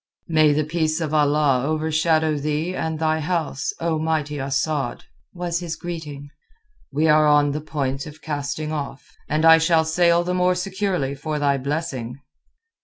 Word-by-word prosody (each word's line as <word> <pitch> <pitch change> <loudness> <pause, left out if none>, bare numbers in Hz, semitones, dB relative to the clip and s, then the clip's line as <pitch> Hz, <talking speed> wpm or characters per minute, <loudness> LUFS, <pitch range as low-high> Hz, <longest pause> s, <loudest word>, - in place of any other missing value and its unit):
"May 155 -2 +4
the 150 +1 +1
peace 155 0 -1
of 155 -2 -3
Allah 145 -3 +3
overshadow 155 +1 +1
thee 155 +5 -2
and 160 -2 -2
thy 160 0 +1
house, 155 -3 -2
O 165 -1 -1
mighty 155 -2 -1
Asad," 135 -1 -2 0.3
was 175 -1 -3
his 170 -2 -4
greeting. 150 -5 -7 0.6
"We 150 +3 +1
are 155 0 +5
on 145 -1 +4
the 150 +2 -3
point 135 -2 -3
of 150 +1 -11
casting 150 0 -4
off, 145 -3 -6
and 155 +2 +1
I 165 0 +8
shall 160 0 +3
sail 170 +1 +3
the 180 +1 -2
more 180 0 +2
securely 180 -6 -2
for 150 +2 -4
thy 140 -2 +1
blessing." 135 -3 -4
155 Hz, 160 wpm, -22 LUFS, 145-165 Hz, 0.6 s, I